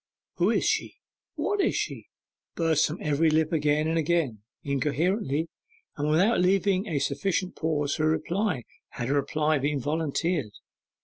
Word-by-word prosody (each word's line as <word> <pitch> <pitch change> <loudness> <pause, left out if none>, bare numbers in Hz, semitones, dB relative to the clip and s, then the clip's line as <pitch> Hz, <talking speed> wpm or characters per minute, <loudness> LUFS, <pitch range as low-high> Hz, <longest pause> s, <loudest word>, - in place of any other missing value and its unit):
'Who - - +3
is - - +1
she? - - 0 0.4
what 410 -1 0
is - - +1
she?' - - -3 0.5
burst 160 -3 +2
from 155 - -5
every 150 +2 +2
lip 155 +1 +1
again 150 0 +2
and 165 +1 +1
again, 155 -8 0 0.2
incoherently, 150 - 0 0.5
and 145 +1 -1
without 190 +10 +3
leaving 195 +2 +2
a 160 -6 -1
sufficient 170 +7 -1
pause 150 -3 -1
for 155 - 0
a - - +3
reply, 160 - 0 0.3
had 120 +1 -5
a - - +2
reply 150 +2 +1
been 145 +1 0
volunteered. 150 - -1
155 Hz, 150 wpm, -27 LUFS, 145-170 Hz, 0.5 s, Who